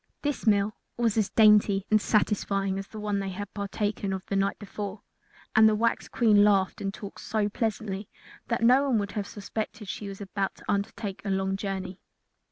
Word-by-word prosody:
This 290 -5 -2
meal 205 0 +3 0.2
was 230 -3 +1
as 215 -3 +1
dainty 210 -3 +5
and 215 -1 +5
satisfying 195 -2 +1
as 195 - -7
the 215 - -9
one 210 -1 -1
they 195 -1 -3
had 195 +2 -6
partaken 200 0 -2
of 190 -1 -5
the 195 - -3
night 195 0 +1
before, 205 -1 -6 0.5
and 220 0 +8
the 215 - +2
wax 230 +2 0
Queen 215 -4 +4
laughed 195 -2 +2
and 195 - -1
talked 200 0 -9
so 215 -2 0
pleasantly 210 -2 -3 0.4
that 230 -1 -1
no 255 +4 +6
one 245 - +3
would 200 -1 -2
have 205 -2 -3
suspected 215 +1 -5
she 200 +1 -5
was 195 -1 -7
about 195 -1 -3
to - - -16
undertake 200 0 -2
a 200 - -3
long 190 0 0
journey. 195 -2 -4
205 Hz, 190 wpm, -27 LUFS, 195-215 Hz, 0.5 s, and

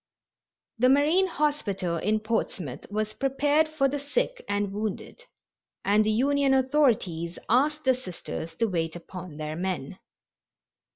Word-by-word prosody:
The 255 +2 +5
Marine 305 +8 +4
Hospital 210 - -1
in 215 +5 0
Portsmouth 205 - -3
was 215 +1 -2
prepared 290 +3 +2
for 310 -3 +2
the 285 +2 -2
sick - - -2
and 205 -1 0
wounded, 215 - -5 0.6
and 210 +2 +4
the 215 - 0
Union 275 +4 +3
authorities 235 - +1
asked 295 +6 +2
the 260 - +4
Sisters 175 -7 -7
to 230 - +1
wait 165 -5 -1
upon 175 -2 -9
their 155 0 -4
men. 185 -1 -3
220 Hz, 130 wpm, -27 LUFS, 185-285 Hz, 0.6 s, The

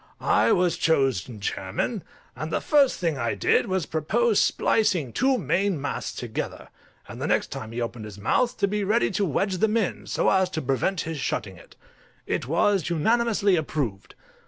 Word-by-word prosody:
I 110 +2 +3
was 175 -2 +2
chosen 130 - +1
chairman, - - -3 0.3
and 155 +1 -5
the - - +1
first 285 -3 +3
thing 165 -6 -1
I 115 -3 -1
did 100 - +2
was 190 -2 0
to - - -10
propose 210 +8 +2
splicing 175 - +1
two 265 +1 +2
main 180 - 0
masts 145 - -4
together, 120 -3 -5 0.4
and - - -9
the - - -1
next - - +1
time 110 0 -6
he 120 +1 -4
opened 115 -1 -4
his 105 -2 -9
mouth 235 - +1
to 200 - +2
be 205 +1 -1
ready 215 +4 +2
to 205 - 0
wedge 190 +4 0
them 220 +1 +2
in, 215 -5 -2
so - - +1
as 190 -1 +3
to 185 - -3
prevent 140 +8 0
his 160 -2 -5
shutting 100 -7 -3
it. 85 - -17 0.5
It - - -2
was 170 +3 +2
unanimously 205 +3 +2
approved. 140 - -3
170 Hz, 180 wpm, -25 LUFS, 130-205 Hz, 0.5 s, I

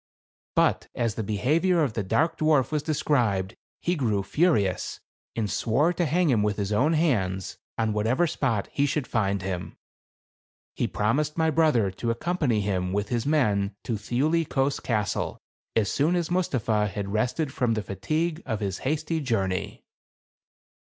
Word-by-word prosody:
But - - +2
as 115 -3 0
the 110 - -3
behavior 155 - +2
of 130 -7 -1
the 110 - -1
dark 115 - +1
dwarf 150 -4 +3
was 150 -1 0
described, 120 -10 0 0.3
he 175 - +1
grew 110 - 0
furious, 105 - +1 0.4
and 110 -2 0
swore 135 - +1
to 175 -1 0
hang 170 0 +2
him 110 -4 +3
with 105 -1 0
his 100 -1 -2
own 145 +10 +3
hands, 100 - 0 0.2
on 110 -1 +1
what 105 +1 0
ever 130 +9 +3
spot 130 -10 -1
he 140 0 +1
should 145 -1 -1
find 100 -6 0
him. 90 -2 -4 1.0
He - - 0
promised 145 +9 0
my 160 -1 +2
brother 140 -11 +3
to 115 +5 -4
accompany 125 -2 0
him 95 -2 -1
with 105 +1 -1
his 120 +1 -1
men 105 -10 +1
to 120 - -2
Thiuli 140 +10 +1
Kos 135 +1 +1
Castle 105 -4 -1 0.4
as 110 -3 +2
soon 155 +5 +2
as 175 -1 -1
Mus 180 -1 +1
tapha 110 -4 +1
had 100 +1 -4
rested 125 +6 0
from 120 -3 +1
the 110 - -2
fatigue 155 - -2
of 110 -5 -3
his 100 -3 -3
hasty 155 +3 -1
journey. 95 -8 -2
120 Hz, 165 wpm, -26 LUFS, 105-155 Hz, 1.0 s, dwarf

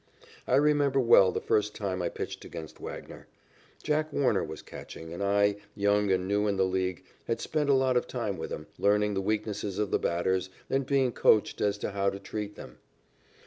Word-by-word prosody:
I - - +3
remember 145 -1 +3
well 115 -7 +6
the - - -2
first 105 0 0
time 95 -3 -2
I 85 - 0
pitched - - -6
against 80 -1 -9
Wagner. - - -8 0.6
Jack 155 +1 0
Warner 140 -2 +2
was - - -7
catching, 80 0 -9
and 85 - -6
I, 100 0 +2 0.2
young 100 0 +2
and 95 0 +1
new 105 +1 +1
in 100 -1 0
the 95 - +3
League, 95 -1 -1 0.2
had 115 -1 -1
spent 150 +1 -1
a 140 - +6
lot 130 -1 +2
of 125 - +1
time 105 -7 -3
with - - -4
him, 75 - -5
learning 105 +1 +3
the 95 - -1
weaknesses 105 -1 -2
of 105 -2 -1
the - - +2
batters 95 +2 0 0.2
and 135 -1 +1
being 135 -3 +2
coached 110 -2 +3
as 100 0 +1
to 105 - -4
how 100 0 +1
to 100 - -5
treat 105 +1 -6
them. - - -11
105 Hz, 200 wpm, -29 LUFS, 95-125 Hz, 0.6 s, well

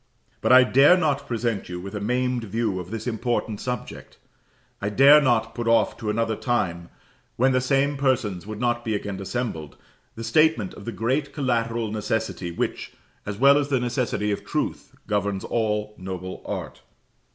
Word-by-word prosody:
But - - +2
I 130 0 +9
dare 140 +8 +6
not 145 -5 0
present 115 -5 -2
you 90 0 -5
with 95 +2 -8
a 105 - -3
maimed 125 +2 -1
view 110 -2 -1
of 90 -1 -7
this 110 +1 -5
important 115 -2 -2
subject: 125 -2 -6 0.6
I 100 - -1
dare 140 +7 +7
not 115 -4 +1
put 120 -1 -4
off 115 -2 +3
to 110 -3 -4
another 110 +1 0
time, 90 -9 -2 0.5
when 130 +3 +3
the 130 0 +2
same 140 +2 +1
persons 110 -9 0
would 110 -1 -6
not 120 0 0
be 110 -3 -1
again 100 -1 -4
assembled, 95 - -4 0.4
the 115 - -6
statement 135 - +2
of 100 - -11
the 115 - -3
great 130 +6 -1
collateral 115 -5 -1
necessity 110 -3 -2
which, 85 - -3 0.3
as 105 -1 -4
well 140 +4 +6
as 145 - -1
the 135 -2 +2
necessity 120 -4 -1
of 100 - -3
truth, - - -3
governs 100 -2 -1
all 105 -2 -1
noble 95 0 -6
art. - - -5
115 Hz, 175 wpm, -24 LUFS, 105-125 Hz, 0.6 s, I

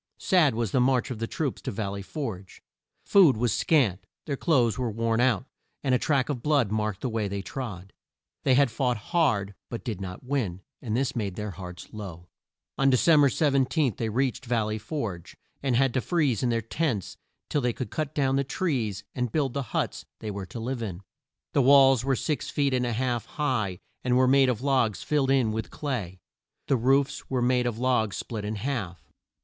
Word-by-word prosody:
Sad 165 - +3
was 115 -4 -1
the - - +2
march 130 +1 +2
of 115 - -5
the 115 - -2
troops 145 -1 -3
to - - -4
Val 100 -1 -3
ley 100 0 -5
Forge. 100 -5 -6 0.4
Food 175 - +6
was 120 -2 +1
scant, 105 - +2 0.2
their 145 - -2
clothes 125 - +2
were 125 -2 -1
worn 115 +1 0
out, 125 -3 +2 0.4
and 135 -2 +2
a 125 - +3
track 140 -4 +1
of 140 -5 -3
blood 140 -7 +2
marked 110 -2 -1
the - - -1
way 110 -2 -1
they 100 0 -4
trod. 100 -8 -6 0.5
They 130 - +3
had 140 -2 +4
fought 125 0 0
hard, 105 - +1 0.2
but 120 +2 -6
not 95 -1 -6
to - - -19
win, 115 -10 -2 0.2
and 115 -2 -2
this 135 0 0
made 100 -6 -2
their 105 +1 -4
hearts 90 0 -9
low. 90 -5 -8 0.5
On 135 0 +5
De 130 - +4
cem 155 +2 +5
ber 140 - +6
17, 135 -2 +2
they 115 - -1
reached 130 +3 -1
Val 115 -2 +1
ley 110 0 -3
Forge, 105 - -5 0.2
and 135 -3 +1
had 135 0 +3
to 130 - +1
freeze 145 - +1
in 125 - +1
their 115 -1 0
tents 115 - -2 0.3
till 145 - 0
they 120 -1 +1
could 125 +2 -6
cut 155 -3 -3
down 135 -2 +2
the 140 - +2
trees 125 - -2
and 125 -3 -2
build 140 -3 0
the 140 - -1
huts - - -2
they 110 -2 -5
were 100 -2 -6
to 95 - -7
live 120 +2 -3
in. 100 -4 -5 0.5
The 140 - +4
walls 135 -2 +6
were 135 0 +1
six 150 +4 -2
feet 140 -2 +1
and 125 -1 +1
a 120 - -1
half 120 0 -1
high, 115 - -1 0.3
and 125 0 +2
were 130 0 +4
made 135 0 +5
of 125 0 -2
logs 130 -7 +1
filled 145 -3 +1
in 130 -5 +3
with 110 +1 -3
clay. 110 - -4 0.5
The 135 - +2
roofs 135 +3 +1
were 130 -2 0
made 125 0 +2
of 115 -2 -2
logs 120 -4 +1
split 110 -3 -5
in 105 +1 -3
half. 100 - -4
125 Hz, 210 wpm, -27 LUFS, 105-135 Hz, 0.5 s, Food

